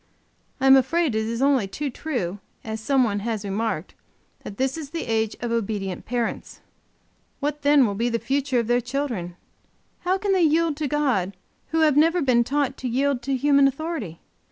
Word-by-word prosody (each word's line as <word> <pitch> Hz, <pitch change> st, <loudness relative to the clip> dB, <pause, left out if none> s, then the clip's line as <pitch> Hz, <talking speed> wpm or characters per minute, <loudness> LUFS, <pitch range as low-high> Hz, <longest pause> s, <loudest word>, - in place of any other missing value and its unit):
I 265 Hz, -, 0 dB
am 270 Hz, 0 st, +8 dB
afraid 315 Hz, +2 st, +2 dB
it 220 Hz, 0 st, -1 dB
is 230 Hz, +3 st, -2 dB
only 270 Hz, -7 st, +3 dB
too 280 Hz, +9 st, -4 dB
true, 235 Hz, -, -3 dB, 0.2 s
as 220 Hz, 0 st, -5 dB
some 270 Hz, +3 st, +3 dB
one 205 Hz, -4 st, 0 dB
has 215 Hz, -1 st, -3 dB
remarked, 200 Hz, -4 st, -2 dB, 0.5 s
that 200 Hz, -, -9 dB
"this 265 Hz, 0 st, 0 dB
is 310 Hz, -4 st, -7 dB
the 330 Hz, +2 st, -4 dB
age 220 Hz, -2 st, -1 dB
of 240 Hz, -1 st, -3 dB
obedient 205 Hz, -5 st, -3 dB
parents!" 240 Hz, -1 st, -3 dB, 0.8 s
What 295 Hz, +1 st, -2 dB
then 285 Hz, -2 st, +5 dB
will 205 Hz, -, -1 dB
be 230 Hz, +4 st, 0 dB
the 230 Hz, -, 0 dB
future 265 Hz, +3 st, -1 dB
of 235 Hz, -, +1 dB
their 240 Hz, +2 st, +2 dB
children? 245 Hz, -9 st, -3 dB, 0.6 s
How 370 Hz, +2 st, 0 dB
can 400 Hz, +1 st, -1 dB
they 375 Hz, -, +3 dB
yield 325 Hz, -1 st, +3 dB
to 305 Hz, -1 st, -1 dB
God 250 Hz, -11 st, 0 dB, 0.3 s
who 325 Hz, +1 st, 0 dB
have 305 Hz, -3 st, +4 dB
never 330 Hz, +4 st, +4 dB
been 245 Hz, -3 st, +3 dB
taught 275 Hz, +1 st, -1 dB
to 260 Hz, -, -4 dB
yield 265 Hz, +1 st, 0 dB
to 270 Hz, +2 st, -1 dB
human 280 Hz, +1 st, +4 dB
authority? 275 Hz, -, -4 dB
260 Hz, 190 wpm, -24 LUFS, 225-290 Hz, 0.8 s, am